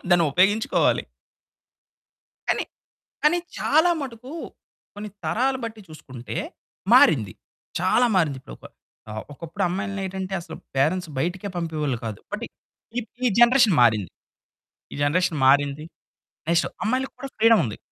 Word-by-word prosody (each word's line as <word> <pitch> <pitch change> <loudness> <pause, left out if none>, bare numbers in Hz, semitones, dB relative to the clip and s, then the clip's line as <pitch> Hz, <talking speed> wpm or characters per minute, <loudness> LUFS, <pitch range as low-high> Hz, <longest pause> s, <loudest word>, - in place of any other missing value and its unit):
దాన్ని 175 -1 +5
ఉపయోగించుకోవాలి. 205 +6 +3 1.5
కానీ - - +1 0.6
కానీ 325 +4 +4 0.2
చాలా 320 +4 +4
మటుకు 255 -1 -7 0.6
కొన్ని 205 0 -7
తరాల 265 +3 +1
బట్టి 220 -1 -6
చూసుకుంటే 130 -6 -9 0.6
మారింది. 110 - +6 0.5
చాలా 190 +7 +3
మారింది. 155 -7 +1
ఇప్పుడొక - - -12 0.4
ఆహ్, 110 0 -5
ఒకప్పుడు 160 +3 -6
అమ్మాయిలనేంటంటే 190 0 -3
అసలు 165 -1 -9 0.2
పేరెంట్స్ 165 +6 +1
బయటికే 180 +7 -2
పంపేవాళ్ళు 155 -6 -2
కాదు. 105 -3 -5
బట్టి - - -3 0.5
ఇప్ 230 - -11 0.2
ఈ - - +5
జనరేషన్ 240 -4 +6
మారింది. 110 -5 +3 0.8
ఈ - - -6
జనరేషన్ 165 +2 +1
మారింది. 145 +2 +3 0.7
నెక్స్టు, 170 0 +2
అమ్మాయికి 255 +4 0
కూడా 270 +2 -7
ఫ్రీడముంది. 220 - +4
185 Hz, 115 wpm, -24 LUFS, 145-225 Hz, 1.5 s, మారింది